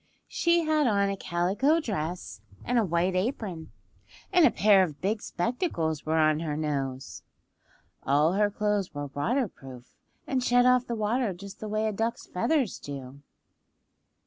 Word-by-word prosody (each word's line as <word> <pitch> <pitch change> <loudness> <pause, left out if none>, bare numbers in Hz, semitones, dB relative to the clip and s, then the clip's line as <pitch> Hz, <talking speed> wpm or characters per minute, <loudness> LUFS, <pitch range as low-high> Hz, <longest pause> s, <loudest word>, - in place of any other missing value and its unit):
She 340 0 +2
had 310 -3 +2
on 200 -3 +2
a - - -2
calico 195 - +1
dress 180 - -4 0.2
and 245 0 +2
a - - +3
white 175 0 0
apron, 185 - -3 0.6
and 345 -3 +7
a - - +4
pair 200 -1 +5
of 155 -6 -2
big 205 +3 -1
spectacles 175 - -2
were 160 +1 +1
on 155 -1 +3
her 155 -2 -3
nose. 135 -4 -3 0.8
(All 150 +5 +2
her 205 +1 +2
clothes 205 -4 -1
were 145 -1 -5
waterproof, 145 - -3 0.3
and 260 -2 -1
shed 245 0 +4
off 250 0 +4
the 235 - -2
water 220 0 0
just 195 +2 -11
the 215 - -6
way 215 +1 0
a - - 0
duck's 225 +3 -2
feathers 260 - 0
do.) 140 -1 -8
195 Hz, 155 wpm, -27 LUFS, 155-235 Hz, 0.8 s, and